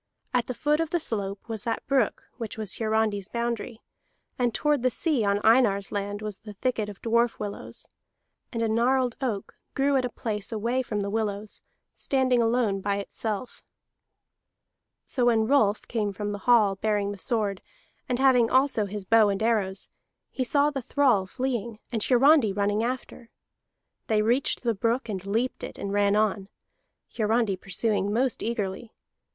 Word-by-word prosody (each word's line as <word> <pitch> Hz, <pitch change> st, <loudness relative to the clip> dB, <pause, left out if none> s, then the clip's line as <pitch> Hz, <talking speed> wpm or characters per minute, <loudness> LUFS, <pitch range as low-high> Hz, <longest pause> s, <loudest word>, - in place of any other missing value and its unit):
At 245 Hz, -2 st, +1 dB
the 255 Hz, -, -4 dB
foot 300 Hz, +3 st, +1 dB
of 330 Hz, -1 st, 0 dB
the 345 Hz, -, 0 dB
slope 200 Hz, -9 st, -4 dB
was 220 Hz, -2 st, -5 dB
that 230 Hz, -, -3 dB
brook 275 Hz, -1 st, +1 dB
which 225 Hz, -4 st, -6 dB
was 215 Hz, -3 st, -3 dB
Hiarandi's 215 Hz, -3 st, 0 dB
boundary, 235 Hz, -1 st, -3 dB, 0.6 s
and 245 Hz, -1 st, +2 dB
toward 295 Hz, +3 st, +1 dB
the 255 Hz, -, +3 dB
sea 280 Hz, -1 st, +1 dB
on 200 Hz, 0 st, +2 dB
Einar's 220 Hz, -4 st, +4 dB
land 205 Hz, 0 st, -3 dB
was 210 Hz, -2 st, -5 dB
the 210 Hz, -1 st, -10 dB
thicket 215 Hz, 0 st, -2 dB
of 200 Hz, -, -11 dB
dwarf 235 Hz, +1 st, +2 dB
willows. 205 Hz, -1 st, -7 dB, 0.6 s
And 230 Hz, -2 st, -2 dB
a -, -, +2 dB
gnarled 245 Hz, +2 st, +2 dB
oak 220 Hz, -7 st, -3 dB, 0.2 s
grew 280 Hz, 0 st, +2 dB
at 260 Hz, -, +1 dB
a 250 Hz, -, -1 dB
place 215 Hz, -3 st, -4 dB
away 230 Hz, +4 st, 0 dB
from 210 Hz, -5 st, -3 dB
the 200 Hz, 0 st, -3 dB
willows, 210 Hz, -1 st, -3 dB, 0.3 s
standing 260 Hz, -3 st, +2 dB
alone 225 Hz, -4 st, +1 dB
by 200 Hz, +1 st, 0 dB
itself. 210 Hz, +3 st, -4 dB, 1.4 s
So 250 Hz, -3 st, 0 dB
when 225 Hz, -2 st, +3 dB
Rolf 220 Hz, -5 st, +2 dB
came 215 Hz, -3 st, -1 dB
from 205 Hz, +1 st, -4 dB
the 205 Hz, -, -5 dB
hall, 210 Hz, -5 st, +5 dB
bearing 205 Hz, -1 st, 0 dB
the 200 Hz, -, -8 dB
sword, 210 Hz, -4 st, -1 dB, 0.5 s
and 250 Hz, -, +1 dB
having 255 Hz, -3 st, +4 dB
also 260 Hz, -5 st, +3 dB
his 200 Hz, 0 st, -6 dB
bow 220 Hz, +1 st, +5 dB
and 200 Hz, +1 st, -1 dB
arrows, 200 Hz, -4 st, 0 dB, 0.4 s
he 260 Hz, -, -2 dB
saw 285 Hz, +3 st, +3 dB
the 275 Hz, -2 st, -3 dB
thrall 245 Hz, -7 st, +2 dB
fleeing, 235 Hz, -2 st, -3 dB
and 225 Hz, -3 st, -1 dB
Hiarandi 260 Hz, -1 st, +5 dB
running 205 Hz, +2 st, 0 dB
after. 245 Hz, -1 st, -5 dB, 0.8 s
They 215 Hz, -1 st, +2 dB
reached 245 Hz, +5 st, +1 dB
the 235 Hz, -2 st, +1 dB
brook, 230 Hz, +4 st, -1 dB
and 190 Hz, -3 st, -4 dB
leaped 230 Hz, +5 st, -1 dB
it, -, -, -6 dB
and 200 Hz, 0 st, -4 dB
ran 205 Hz, 0 st, +3 dB
on, 210 Hz, -2 st, 0 dB, 0.7 s
Hiarandi 220 Hz, -2 st, +1 dB
pursuing 205 Hz, +1 st, -1 dB
most 250 Hz, +3 st, 0 dB
eagerly. 220 Hz, -1 st, -3 dB
225 Hz, 170 wpm, -26 LUFS, 205-250 Hz, 1.4 s, hall